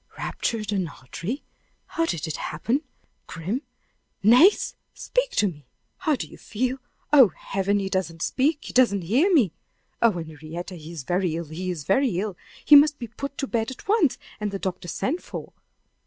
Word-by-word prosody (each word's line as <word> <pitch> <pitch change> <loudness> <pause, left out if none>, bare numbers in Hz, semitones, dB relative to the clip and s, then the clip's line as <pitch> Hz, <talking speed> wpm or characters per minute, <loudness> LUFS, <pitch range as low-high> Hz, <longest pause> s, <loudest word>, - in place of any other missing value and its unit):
"Ruptured 215 -3 -2
an 190 -4 0
artery? 170 - -6 0.4
How 330 0 -1
did 165 - -2
it 160 - -4
happen? 230 - -1 0.5
Grim! 185 - -3 0.6
Nace! 250 - +6 0.2
speak - - 0
to 210 - +4
me! 150 -7 -8 0.3
How 315 -5 +1
do - - -4
you - - -14
feel? 255 +4 -2 0.3
Oh, 270 -5 +9
Heaven! 195 +1 0
he 195 -1 -1
doesn't 180 -4 -2
speak 295 +3 +1
he - - -7
doesn't 215 -7 +4
hear 260 - +3
me! 240 - +4 0.5
Oh, 230 -2 +5
Henrietta! 160 +1 -7
he 165 -2 -9
is 165 -5 -6
very 175 +2 0
ill 170 0 -3
he 180 +4 -4
is 170 -5 -3
very 195 - +2
ill! 205 -1 -3 0.3
He 295 - +9
must 295 +1 +7
be 235 -4 -6
put 280 +4 -6
to - - -1
bed 230 -3 -1
at 260 - -10
once, 395 - +3 0.2
and 210 -1 -1
the 200 - -3
doctor 185 -2 -4
sent 300 - -2
for! - - -8
205 Hz, 180 wpm, -25 LUFS, 175-270 Hz, 0.6 s, Oh